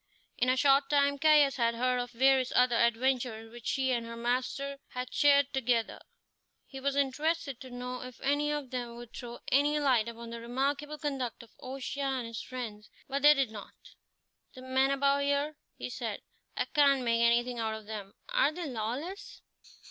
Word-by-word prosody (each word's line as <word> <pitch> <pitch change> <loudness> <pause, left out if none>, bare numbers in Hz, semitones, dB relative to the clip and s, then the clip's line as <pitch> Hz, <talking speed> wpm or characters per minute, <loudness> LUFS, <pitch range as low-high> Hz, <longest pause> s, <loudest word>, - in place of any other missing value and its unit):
In 250 - +2
a 255 - +3
short 275 +1 +4
time 280 -1 +2
Caius 295 -3 +5
had 235 -1 +1
heard 250 +1 +1
of 245 0 -3
various 260 +1 +3
other 250 -1 +4
adventures 235 -1 +1
which 240 -1 -9
she 265 -1 +1
and 240 -2 0
her 230 0 -8
master 255 +4 -2
had 250 0 -6
shared 285 -1 +4
together. 245 -3 0 0.7
He 270 - -9
was 280 +1 -1
interested 280 0 -1
to 260 - -9
know 250 0 -6
if 255 -1 -9
any 290 +2 +1
of 295 -4 -4
them 240 -2 -4
would 240 -1 -11
throw 240 -1 -7
any 290 +2 +3
light 255 -6 +3
upon 235 0 -8
the 235 0 -6
remarkable 280 +5 -2
conduct 270 -6 -3
of 230 - -19
O'Shea 270 +2 -5
and 265 -3 -1
his 230 -1 -6
friends; 225 -5 -7 0.2
but 275 +1 -2
they 295 +1 +8
did 270 -5 0
not. 210 -2 -10 0.8
"The 255 - -10
men 260 +1 +2
about 280 0 +2
here," 285 +2 0 0.2
he - - -6
said - - -4 0.4
"I - - +1
can't 280 -3 +3
make 230 -1 +2
anything 240 +1 +2
out 220 -1 -1
of 220 -1 -9
them 205 -2 -7
are - - +3
they 345 +2 -5
lawless?" 265 - -5
255 Hz, 185 wpm, -30 LUFS, 235-280 Hz, 0.8 s, they